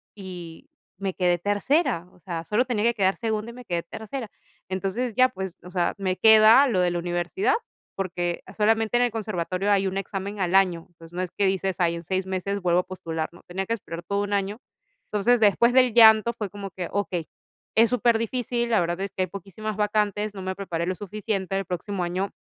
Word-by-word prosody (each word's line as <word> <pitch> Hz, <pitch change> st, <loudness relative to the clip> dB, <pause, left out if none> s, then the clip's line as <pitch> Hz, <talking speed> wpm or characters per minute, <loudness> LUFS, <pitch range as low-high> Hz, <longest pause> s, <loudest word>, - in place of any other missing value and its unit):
y 180 Hz, -4 st, -9 dB, 0.3 s
me 195 Hz, 0 st, -3 dB
quedé 180 Hz, -1 st, +2 dB
tercera, 205 Hz, -, +1 dB
o -, -, -22 dB
sea, 170 Hz, -2 st, -5 dB
solo 230 Hz, +7 st, +1 dB
tenía 230 Hz, -4 st, -1 dB
que 235 Hz, +1 st, +2 dB
quedar 190 Hz, -2 st, +2 dB
segunda 220 Hz, 0 st, -3 dB
y -, -, -13 dB
me 250 Hz, -, -11 dB
quedé 175 Hz, -4 st, -2 dB
tercera. 220 Hz, +7 st, -6 dB, 0.4 s
Entonces 195 Hz, +6 st, -2 dB
ya, 255 Hz, 0 st, +5 dB
pues, 190 Hz, -7 st, -6 dB
o 180 Hz, -, -10 dB
sea, 175 Hz, -2 st, 0 dB
me 185 Hz, -2 st, 0 dB
queda 220 Hz, +5 st, +7 dB
lo 215 Hz, -8 st, +1 dB
de 180 Hz, -1 st, +3 dB
la 175 Hz, -, -2 dB
universidad 175 Hz, -, 0 dB, 0.4 s
porque 175 Hz, -2 st, -3 dB
solamente 220 Hz, +2 st, +2 dB
en 245 Hz, -, +3 dB
el 245 Hz, -, +1 dB
conservatorio 200 Hz, -3 st, -2 dB
hay 195 Hz, -1 st, +3 dB
un 190 Hz, 0 st, -2 dB
examen 195 Hz, +1 st, -4 dB
al 185 Hz, -1 st, +1 dB
año. 180 Hz, -4 st, +3 dB
Entonces, 165 Hz, -1 st, -16 dB
no 180 Hz, -, -2 dB
es 185 Hz, -, -2 dB
que 200 Hz, -, 0 dB
dices: 190 Hz, 0 st, 0 dB
"Ay, 170 Hz, -2 st, +2 dB
en 170 Hz, -, -7 dB
6 185 Hz, +2 st, -1 dB
meses 190 Hz, +1 st, -2 dB
vuelvo 175 Hz, -1 st, +3 dB
a -, -, 0 dB
postular", 165 Hz, -4 st, -4 dB
no, 175 Hz, -, -17 dB
tenía 190 Hz, +2 st, -4 dB
que 230 Hz, -, 0 dB
esperar 170 Hz, -6 st, -8 dB
todo 200 Hz, +4 st, -1 dB
un 205 Hz, 0 st, -3 dB
año. 200 Hz, +2 st, -1 dB, 0.5 s
Entonces, 230 Hz, +4 st, +2 dB
después 220 Hz, +3 st, +4 dB
del 255 Hz, -2 st, +4 dB
llanto, 220 Hz, 0 st, +7 dB
fue 215 Hz, -3 st, -4 dB
como 200 Hz, 0 st, -7 dB
que 180 Hz, -2 st, -5 dB
okey, 185 Hz, -5 st, -2 dB, 0.5 s
es 225 Hz, +1 st, +5 dB
superdifícil, 240 Hz, 0 st, 0 dB
la 220 Hz, -, +4 dB
verdad 175 Hz, +1 st, -1 dB
es 195 Hz, -, -4 dB
que 185 Hz, -, -1 dB
hay -, -, +1 dB
poquísimas 200 Hz, +3 st, -6 dB
vacantes, 210 Hz, 0 st, 0 dB
no 190 Hz, -, -7 dB
me 190 Hz, 0 st, -3 dB
preparé 170 Hz, -4 st, -3 dB
lo 185 Hz, -, -1 dB
suficiente, 200 Hz, -1 st, -3 dB
el 195 Hz, -, -1 dB
próximo 180 Hz, +2 st, -3 dB
año 185 Hz, +3 st, -2 dB
195 Hz, 215 wpm, -25 LUFS, 180-220 Hz, 0.5 s, queda